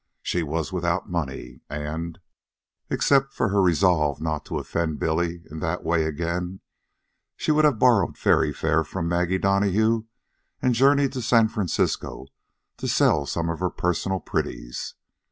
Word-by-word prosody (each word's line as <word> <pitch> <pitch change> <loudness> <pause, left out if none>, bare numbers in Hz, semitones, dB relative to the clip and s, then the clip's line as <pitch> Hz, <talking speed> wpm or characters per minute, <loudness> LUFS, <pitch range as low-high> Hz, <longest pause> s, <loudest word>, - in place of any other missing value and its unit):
She 90 - 0
was 80 +3 -3
without 85 0 -1
money, 65 -7 -4
and, 80 +3 -5 0.7
except 135 -1 +2
for 115 - 0
her 100 0 +2
resolve 85 -5 +3
not 80 -2 -3
to - - -4
offend 80 -3 -2
Billy 85 +1 -1
in 80 - -6
that 90 +1 -2
way 80 -1 +1
again, 85 +4 -3 0.8
she - - 0
would 155 0 +4
have 145 -6 +3
borrowed 115 -5 +3
ferry - - +3
fare 80 +1 +1
from 85 +2 -4
Maggie 90 +2 +1
Donahue 100 +4 +2 0.5
and 125 -1 +2
journeyed 140 +3 +4
to 130 - -3
San 115 -2 +4
Francisco 95 -9 -1 0.5
to - - -4
sell 70 - +3
some 85 -1 -2
of 80 - -5
her 90 0 0
personal 95 +2 -1
pretties. - - -4
85 Hz, 150 wpm, -24 LUFS, 80-100 Hz, 0.8 s, would